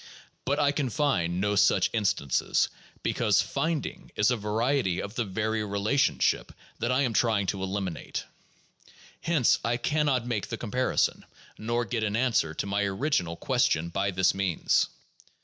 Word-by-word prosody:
But 140 +2 +1
I 145 -1 +3
can 140 -3 -1
find 90 - 0
no 105 +1 +1
such 100 +1 +3
instances, 95 - +1 0.3
because - - +2
"find 165 -3 -1
ing" - - -8
is 105 +3 +3
a - - +2
variety 110 -1 0
of 100 - -5
the 120 - -1
very 110 +2 -1
relationship 105 +7 +1 0.3
that 120 +2 0
I 130 +2 +2
am 120 -4 0
trying 110 -4 +2
to - - -7
elimi 95 -1 -2
nate. - - -6 1.0
Hence 160 -8 +3
I 115 +2 0
can 150 +3 0
not 130 -4 +1
make 115 -4 -2
the 115 - -4
comparison, 125 +3 0 0.4
nor 120 +2 -1
get 115 -2 -2
an 105 -1 0
answer 115 -10 +1
to - - -2
my 100 +1 0
original 100 - 0
question 80 0 +1
by 100 +3 -1
this 95 0 +2
means. 95 -4 +1
110 Hz, 165 wpm, -27 LUFS, 100-125 Hz, 1.0 s, I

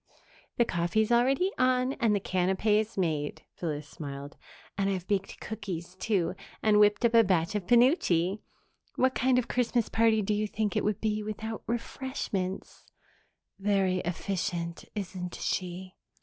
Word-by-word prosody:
"The 235 - +4
coffee's 185 +5 0
already 265 +10 +3
on 255 +1 +3
and 225 -4 +3
the - - +1
canapes 200 +4 +1
made," 155 -5 -1
Phyllis 150 -3 -4
smiled. 140 -2 -8 0.4
"And 195 0 0
I've 185 -3 -2
baked 195 -2 -1
cookies, 180 -4 -6
too, 185 -3 0 0.3
and 210 -1 +5
whipped 210 +3 +4
up 235 - +3
a 230 0 +7
batch 180 -4 +1
of 200 -4 -3
penuche. 215 - +3 0.6
What 260 0 +2
kind 255 0 +2
of 250 - +2
a - - -26
Christmas 245 -2 +1
party 225 -1 +3
do 210 - 0
you 210 +1 0
think 210 -2 -2
it - - +1
would 210 -2 -1
be 215 -1 0
without 215 +1 -5
refreshments?" 230 -5 -4 0.7
"Very 195 -2 +2
efficient, 175 -1 -3
isn't 185 -3 -5
she?" 185 0 -3
205 Hz, 150 wpm, -29 LUFS, 180-225 Hz, 0.7 s, a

